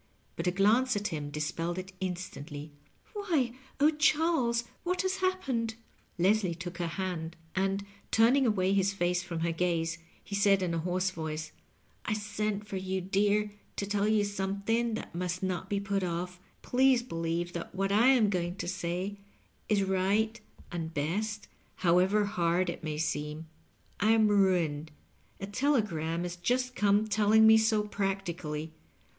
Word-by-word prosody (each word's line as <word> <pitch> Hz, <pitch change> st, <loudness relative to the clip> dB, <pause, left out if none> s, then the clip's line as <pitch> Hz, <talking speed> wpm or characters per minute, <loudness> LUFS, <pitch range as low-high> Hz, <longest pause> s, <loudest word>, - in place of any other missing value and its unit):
But -, -, -3 dB
a -, -, +4 dB
glance 220 Hz, +7 st, +3 dB
at 205 Hz, 0 st, -1 dB
him 150 Hz, -4 st, -4 dB
dispelled 165 Hz, +4 st, -3 dB
it 185 Hz, +1 st, -6 dB
instantly. 155 Hz, -5 st, -5 dB, 0.2 s
" -, -, -33 dB
Why— 330 Hz, -, 0 dB, 0.3 s
oh, 295 Hz, +2 st, +5 dB
Charles, 300 Hz, -6 st, +2 dB, 0.2 s
what 360 Hz, +2 st, 0 dB
has 375 Hz, 0 st, 0 dB
happened? 270 Hz, -12 st, -1 dB, 0.2 s
" -, -, -36 dB
Leslie 185 Hz, 0 st, +2 dB
took 175 Hz, +1 st, -7 dB
her 170 Hz, -, 0 dB
hand, 170 Hz, -2 st, -4 dB, 0.2 s
and 195 Hz, +1 st, 0 dB, 0.2 s
turning 245 Hz, +4 st, +4 dB
away 195 Hz, -3 st, +2 dB
his 200 Hz, 0 st, +2 dB
face 180 Hz, -1 st, +1 dB
from 175 Hz, -2 st, -5 dB
her 170 Hz, 0 st, +1 dB
gaze, 170 Hz, -1 st, 0 dB, 0.2 s
he -, -, -10 dB
said 200 Hz, -1 st, +4 dB
in 175 Hz, -2 st, -1 dB
a 165 Hz, -, 0 dB
hoarse 180 Hz, +2 st, 0 dB
voice, 155 Hz, -2 st, -5 dB, 0.3 s
" -, -, -37 dB
I 210 Hz, -, 0 dB
sent 210 Hz, 0 st, -2 dB
for 195 Hz, -, -4 dB
you, 190 Hz, 0 st, -2 dB
dear, 205 Hz, +3 st, +1 dB, 0.2 s
to 200 Hz, -, -2 dB
tell 205 Hz, 0 st, 0 dB
you 215 Hz, -1 st, +3 dB
something 205 Hz, +4 st, -1 dB
that -, -, -7 dB
must 180 Hz, +1 st, -3 dB
not 185 Hz, 0 st, -2 dB
be 200 Hz, -, 0 dB
put 200 Hz, 0 st, -1 dB
ofiE. 180 Hz, 0 st, -3 dB, 0.2 s
Please 255 Hz, -1 st, +3 dB
believe 170 Hz, -4 st, -2 dB
that 170 Hz, +1 st, -6 dB
what 195 Hz, +1 st, 0 dB
I 220 Hz, +5 st, +5 dB
am 240 Hz, -6 st, +5 dB
going 175 Hz, -1 st, -1 dB
to 195 Hz, -, -5 dB
say 185 Hz, +2 st, -3 dB, 0.5 s
is 205 Hz, -2 st, +3 dB
right 195 Hz, +4 st, +1 dB, 0.3 s
and 165 Hz, -2 st, -4 dB
best, 205 Hz, +8 st, -2 dB, 0.3 s
however 185 Hz, +4 st, +3 dB
hard 175 Hz, -2 st, +1 dB
it 170 Hz, -, -10 dB
may 155 Hz, -1 st, -3 dB
seem. 150 Hz, 0 st, -2 dB, 0.5 s
I 215 Hz, +2 st, +4 dB
am 220 Hz, -1 st, +4 dB
ruined. 175 Hz, -7 st, +2 dB, 0.5 s
A 195 Hz, -, -4 dB
telegram 200 Hz, -, 0 dB
has 175 Hz, 0 st, -5 dB
just 250 Hz, +7 st, 0 dB
come 205 Hz, -1 st, +3 dB
telling 215 Hz, +1 st, +4 dB
me 220 Hz, 0 st, +8 dB
so, 220 Hz, -1 st, +2 dB
practically. 180 Hz, -7 st, -3 dB
195 Hz, 165 wpm, -30 LUFS, 175-215 Hz, 0.5 s, me